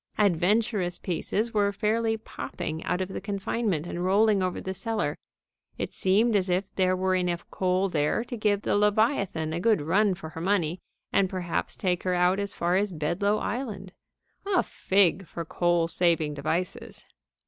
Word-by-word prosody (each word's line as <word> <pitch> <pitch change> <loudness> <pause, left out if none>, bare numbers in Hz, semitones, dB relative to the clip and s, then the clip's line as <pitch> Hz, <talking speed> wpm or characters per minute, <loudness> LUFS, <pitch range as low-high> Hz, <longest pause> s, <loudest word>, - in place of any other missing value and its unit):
Adventurous 200 0 +2
pieces 210 +6 -1
were 205 -1 +2
fairly 225 +2 0
popping 160 -6 -6
out 180 +1 0
of 185 +1 -4
confinement 200 -3 -1
and 175 0 -4
rolling 200 +2 +3
over 185 -1 -1
the 190 - -4
cellar. 225 +2 -2 0.6
It - - -4
seemed 215 +4 +3
as 190 -2 +1
if 185 +2 -1
there 185 -1 +2
were 185 0 +1
enough 180 -2 -1
coal 185 +1 +1
there 155 +5 0
to 245 - -6
give 210 -2 +1
the - - +1
Leviathan 205 - +1
a 170 - -1
good 215 +3 +3
run 190 +6 +2
for 160 -2 -8
her 160 - -8
money 180 -2 +1 0.3
and 195 -1 +3
perhaps 180 -3 -2
take 180 -2 0
her 185 -1 0
out 180 +2 +3
as 200 -1 -3
far 175 +2 +1
as 205 0 0
Bedloe 180 +6 0
Island. 210 -8 -4 0.5
A 385 -3 +3
fig 190 -1 +1
for 170 +1 -6
coal 175 0 +1
saving 165 -3 +1
devices! 160 +5 -3
190 Hz, 165 wpm, -27 LUFS, 175-210 Hz, 0.6 s, rolling